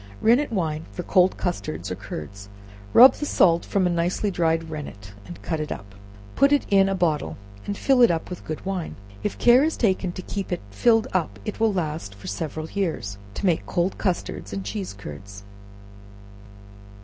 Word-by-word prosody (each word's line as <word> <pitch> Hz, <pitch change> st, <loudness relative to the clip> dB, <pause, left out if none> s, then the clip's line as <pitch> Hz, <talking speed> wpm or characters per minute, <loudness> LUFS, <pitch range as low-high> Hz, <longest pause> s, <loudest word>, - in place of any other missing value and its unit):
Rennet 245 Hz, +5 st, +3 dB
Wine 160 Hz, -6 st, -2 dB
for 180 Hz, -, -5 dB
cold 185 Hz, 0 st, +3 dB
Custards 175 Hz, -4 st, -3 dB
or -, -, -2 dB
Curds. 100 Hz, +6 st, -8 dB, 0.4 s
Rub 255 Hz, +2 st, +9 dB
the 295 Hz, -, -5 dB
salt 170 Hz, -8 st, +4 dB
from 195 Hz, -2 st, 0 dB
a -, -, +3 dB
nicely 175 Hz, +4 st, 0 dB
dried 165 Hz, -2 st, +1 dB
rennet, 105 Hz, -10 st, -8 dB
and 175 Hz, -, -9 dB
cut 160 Hz, -2 st, -2 dB
it 150 Hz, -, -4 dB
up; 100 Hz, 0 st, -7 dB, 0.4 s
put 275 Hz, +1 st, +4 dB
it 290 Hz, -, +3 dB
in 195 Hz, -1 st, +5 dB
a 195 Hz, -, 0 dB
bottle, 160 Hz, -6 st, 0 dB, 0.3 s
and 200 Hz, -, -3 dB
fill 265 Hz, -2 st, +3 dB
it 240 Hz, -, +8 dB
up 165 Hz, -1 st, -1 dB
with 180 Hz, -, -8 dB
good 155 Hz, +3 st, -6 dB
wine. 190 Hz, -3 st, -3 dB, 0.3 s
If 210 Hz, -, -3 dB
care 245 Hz, +3 st, +6 dB
is 315 Hz, +1 st, 0 dB
taken 190 Hz, -4 st, +1 dB
to 185 Hz, -, -7 dB
keep 195 Hz, 0 st, -5 dB
it 175 Hz, -, -2 dB
filled 225 Hz, -, +3 dB
up, 180 Hz, -4 st, -1 dB
it 215 Hz, -, -5 dB
will 225 Hz, -1 st, +3 dB
last 155 Hz, -, -3 dB
for 100 Hz, -, -14 dB
several 155 Hz, +8 st, -4 dB
years, 160 Hz, -, -2 dB, 0.2 s
to -, -, -3 dB
make 175 Hz, -4 st, +1 dB
cold 175 Hz, +2 st, -1 dB
custard 175 Hz, -, -2 dB
and 100 Hz, -1 st, -4 dB
cheese 100 Hz, -1 st, -4 dB
curds. 100 Hz, +2 st, -10 dB
175 Hz, 185 wpm, -24 LUFS, 150-200 Hz, 0.4 s, Rub